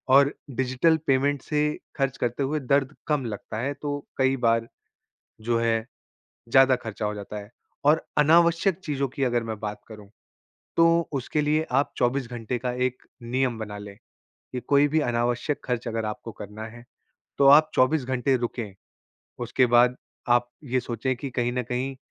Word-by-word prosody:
और 140 +1 +6 0.3
digital 130 +5 +3
payment 135 +1 +2
से 150 +1 -1 0.4
ख़र्च 135 -2 0
करते 120 +3 -1
हुए 150 +3 -1
दर्द 140 +1 +1
कम 150 -4 0
लगता 105 -1 -6
है, 135 +4 -1
तो 145 0 -5
कई 130 0 +2
बार 115 0 +2 0.7
जो 115 +1 +1
है, 115 -1 +1 0.6
ज़्यादा 130 +1 +6
ख़र्चा 110 -2 -5
हो 105 - -2
जाता 105 +1 -7
है। 105 +1 -10 0.3
और 150 +3 +3
अनावश्यक 170 +4 +4
चीज़ों 140 -2 -1
की 135 +2 -6
अगर 120 -2 +1
मैं 110 -2 -5
बात 105 -1 -5
करूँ, 105 -3 -12 0.7
तो 165 0 +4
उसके 140 +2 -1
लिए 150 +1 +2 0.2
आप 145 - -3
24 125 +1 +1
घंटे 120 0 -3
का 125 +1 -2
एक 130 0 -5 0.2
नियम 125 0 -1
बना 105 -2 -6
लें, 100 -1 -10 0.6
कि 125 - -3
कोई 140 +4 +3
भी 155 +2 +1
अनावश्यक 120 +5 0
ख़र्च 125 -1 -2
अगर 115 -1 -2
आपको 105 +2 -5
करना 105 +1 -8
है, 120 +1 -12 0.6
तो 140 - +5
आप 155 +3 +7
24 130 +2 +3
घंटे 130 +1 +1
रुकें। 115 -4 -4 0.7
उसके 125 +2 +3
बाद 125 +1 +5 0.3
आप 120 0 +3 0.2
ये 130 -1 0
सोचें 125 +2 -2
कि 135 +2 -6
कहीं 120 -1 -1
न 125 0 -1
कहीं 125 +3 -3
125 Hz, 170 wpm, -25 LUFS, 115-140 Hz, 0.7 s, आप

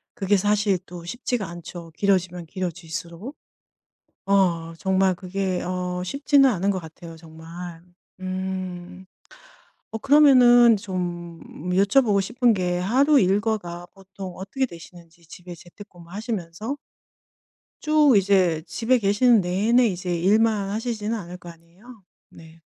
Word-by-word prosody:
그게 205 -2 +1
사실 205 -1 +1
또 175 -1 -10
쉽지가 240 +1 -3
않죠 170 0 -10
길어지면 180 -3 0
길어질 180 -1 -6
수록. 170 - -7 0.9
어 175 -4 +1
정말 190 -1 +1
그게 185 0 -3
어 180 0 -3
쉽지는 275 - +3
않은 200 -2 0
것 190 - -1
같아요 165 0 -12
정말. 165 +1 -10 0.4
음. 185 -1 -5 0.9
어 220 - -5
그러면은 250 -5 +6
좀 175 -3 -5 0.3
여쭤 200 +8 +4
보고 205 -4 +2
싶은 240 +4 +1
게 180 -2 -1
하루 270 +10 +3
일과가 195 -3 -1
보통 195 -1 -10
어떻게 230 +8 -2
되시는지 170 -3 -14
집에 175 +1 -11
재택근무 175 0 -15
하시면서 215 +4 -5 1.0
쭉 305 -3 +4
이제 185 -5 +2
집에 250 +2 +1
계시는 215 +2 +3
내내 210 +8 +2
이제 180 -3 -2
일만 205 +3 +2
하시진 220 0 -3
않을 180 -4 -7
거 175 - -13
아니에요. 180 +7 -16 0.2
네. 165 0 -16
190 Hz, 260 characters per minute, -23 LUFS, 175-220 Hz, 1.0 s, 그러면은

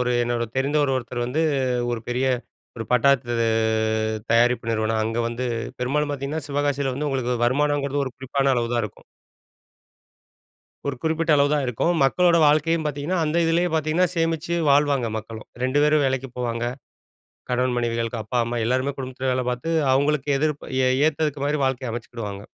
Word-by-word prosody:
ஒரு 125 0 0
என்னோட 120 0 -1
தெரிந்தவரு 140 0 +1
ஒருத்தர் 120 -1 -3
வந்து, 150 +6 0 0.5
ஒரு 115 - -3
பெரிய 125 +2 0 0.5
ஒரு 115 - -4
பட்டாசு 125 -1 +3 1.0
தயாரிப்பு 120 0 +3
நிறுவனம் 110 0 0
அங்க 115 +1 -2
வந்து 120 +2 -3 0.3
பெரும்பாலும் 145 +4 0
பார்த்தீங்கன்னா, 145 +2 -4
சிவகாசியில 140 -2 0
வந்து 145 +3 -2
உங்களுக்கு 125 -3 -1
வருமானம்ங்கிறது 145 +2 +1
ஒரு 130 - -6
குறிப்பான 135 +1 0
அளவுதான் 120 0 0
இருக்கும். 105 - -10 1.8
ஒரு 140 - -2
குறிப்பிட்ட 160 +1 0
அளவுதான் 145 +1 +2
இருக்கும். 125 +8 0
மக்களோட 170 +5 +4
வாழ்க்கையும் 155 +2 +2
பார்த்தீங்கன்னா 150 +5 -2
அந்த 155 +2 -1
இதுலயே 170 +2 +2
பார்த்தீங்கன்னா, 160 +3 +2
சேமிச்சு 165 +1 0
வாழ்வாங்க 140 -3 +3
மக்களும். 110 0 -8
2 130 +3 +1
பேரும் 150 0 +3
வேலைக்கு 130 0 -1
போவாங்க. 120 -1 -2 0.9
கணவன், 125 0 +1
மனைவிகள். 115 -1 -1
அப்பா, 125 - -3
அம்மா, 120 +1 -3
எல்லாருமே 130 +3 +1
குடும்பத்தில 130 0 -3
வேலை 125 0 0
பார்த்து, 125 +6 -4 0.2
அவுங்களுக்கு 145 +1 +1
எதிர்ப் 150 0 -1 0.2
ஏ - - +4 0.2
ஏத்ததுக்கு 150 -2 -1
மாரி 150 +1 0
வாழ்க்கைய 130 -2 -2
அமைச்சுக்கிடுவாங்க. 110 -4 -6
135 Hz, 145 wpm, -23 LUFS, 120-150 Hz, 1.8 s, மக்களோட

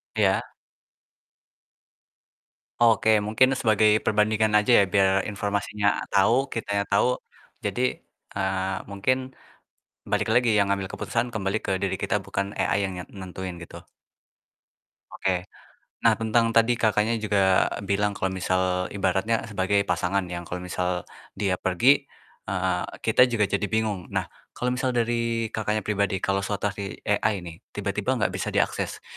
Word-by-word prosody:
Iya. 100 -3 +3 2.4
Oke, 115 -2 +4 0.2
mungkin 110 +5 +4
sebagai 110 -2 +4 0.2
perbandingan 110 +1 +2
aja 105 +4 +1
ya, - - +6
biar 95 -1 +5 0.2
informasinya 100 0 -2 0.2
tahu, 100 +4 +4 0.2
kitanya 100 -3 -1
tahu, 100 +5 +4 0.6
jadi, - - -1 0.5
eee, 95 -1 -1
mungkin, 115 +6 +1 0.9
balik - - +1
lagi 120 -1 +3
yang 100 -1 +4
ngambil 100 -1 -1
keputusan 110 +4 -2
kembali 100 0 -1
ke - - -2
diri 95 -1 0
kita 100 - +1
bukan 100 0 -2
AI - - +1
yang 95 - -2
nyet 90 - -7
nentuin 95 -1 -6
gitu. - - -10 1.3
Oke, 90 0 -2 0.6
nah - - +6
tentang 115 +1 +1
tadi, 115 +1 +4
Kakaknya, 110 +1 +2
juga 100 -3 +3 0.2
bilang 100 +1 0
kalau 95 -1 -1
misal 95 0 0
ibaratnya 100 +3 0
sebagai 100 0 +1
pasangan 100 0 0
yang 85 -1 -5
kalau 90 0 -5
misal 90 -1 -2 0.3
dia 95 -2 -1
pergi, 130 +10 +3 0.4
eee, 90 -2 -1 0.2
kita 120 +3 +5
juga 115 -4 +1
jadi 100 +1 0
bingung. 105 -4 -1
Nah, - - -1 0.2
kalau 125 0 -1
misal 125 0 -1
dari, 115 -1 0
Kakaknya, 110 -1 -1
pribadi 100 -2 -1
kalau 100 0 0
situasi 100 -1 -4
AI 100 -4 0
nih, 85 -2 -9 0.2
tiba-tiba - - -1
enggak - - 0
bisa - - -4
diakses, - - -1
100 Hz, 135 wpm, -25 LUFS, 95-110 Hz, 2.4 s, ya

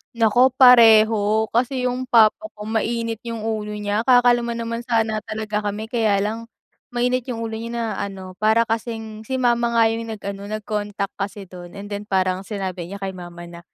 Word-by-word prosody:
Nako 240 +3 +4
pareho. 220 -3 +6
Kasi, 250 +2 0
'yung 255 +1 -3
papa 230 +6 +4
ko 210 - -9
mainit 225 +1 -2
'yung 230 -2 -5
ulo 215 -1 -3
niya, 210 +2 -2
kakalma 240 -2 +4
naman 230 0 -4
sana 225 -2 +1
talaga 215 -1 -3
kami 215 +2 -5
kaya 215 -5 +2
lang, 225 +2 -4 0.5
mainit 250 +1 0
'yung 230 -2 -4
ulo 220 0 -4
niya 230 +1 -6
na 235 -1 -1
ano, 190 -2 -6
para 220 +2 +4
kasing 225 -1 -5
si 260 - -2
mama 240 -2 +1
nga 230 - +5
'yung 230 0 -4
nag-ano, 200 -2 -6
nag-contact 210 -1 -3
kasi 200 0 -4
doon. 175 -1 -12
And 205 +1 -9
then 205 +1 -5
parang 185 -1 0
sinabi 185 -4 -4
niya 200 +1 -8
kay 190 - -2
mama 175 -1 -10
na, 170 - -10
220 Hz, 180 wpm, -21 LUFS, 205-230 Hz, 0.5 s, pareho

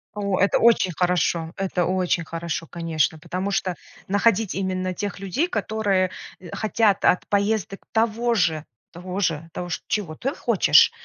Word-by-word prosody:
О, 200 -2 -1
это 200 - +3
очень 230 -5 +4
хорошо, 175 -2 0
это 190 -2 0
очень 180 -2 0
хорошо, 165 0 -4
конечно, 160 -2 -1
потому 185 +5 -4
что 185 -2 -1 0.3
находить 205 +1 +2
именно 185 -1 -2
тех 200 +2 -4
людей, 195 - -1
которые, 205 - 0 0.3
э, 175 -3 -11
хотят 215 -2 +1
от 180 - +3
поездок 200 -1 0
того 230 +1 +1
же 160 -6 +1 0.3
того 180 +2 -5 0.5
ж 165 - -3
чего 195 -7 -2
ты 270 - -3
хочешь, - - +5
185 Hz, 140 wpm, -23 LUFS, 175-210 Hz, 0.5 s, хочешь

